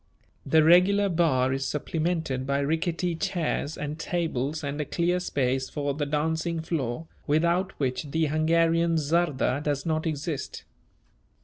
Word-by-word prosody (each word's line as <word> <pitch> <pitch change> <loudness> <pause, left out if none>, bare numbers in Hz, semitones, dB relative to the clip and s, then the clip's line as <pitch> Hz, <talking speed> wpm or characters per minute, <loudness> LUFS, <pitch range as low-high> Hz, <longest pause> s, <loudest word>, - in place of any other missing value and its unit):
The 160 +3 +5
regular 190 +5 +5
bar 140 -7 +2
is 135 0 -2
supplemented 155 -3 -2
by 140 0 +1
rickety 170 +4 0
chairs 160 -3 -2
and 150 +1 -5
tables 160 -4 -2
and 145 +1 -3
a - - -2
clear 175 +3 0
space 130 -6 -1
for 145 -1 -2
the 145 0 -2
dancing 160 +3 -1
floor, 160 -3 -3 0.2
without 170 +5 +1
which 130 +1 -2
the 160 +2 +1
Hungarian 165 +2 +2
czarda 150 -3 +1
does 145 -2 -2
not 160 0 0
exist. 150 -1 -4
155 Hz, 135 wpm, -26 LUFS, 140-170 Hz, 0.2 s, The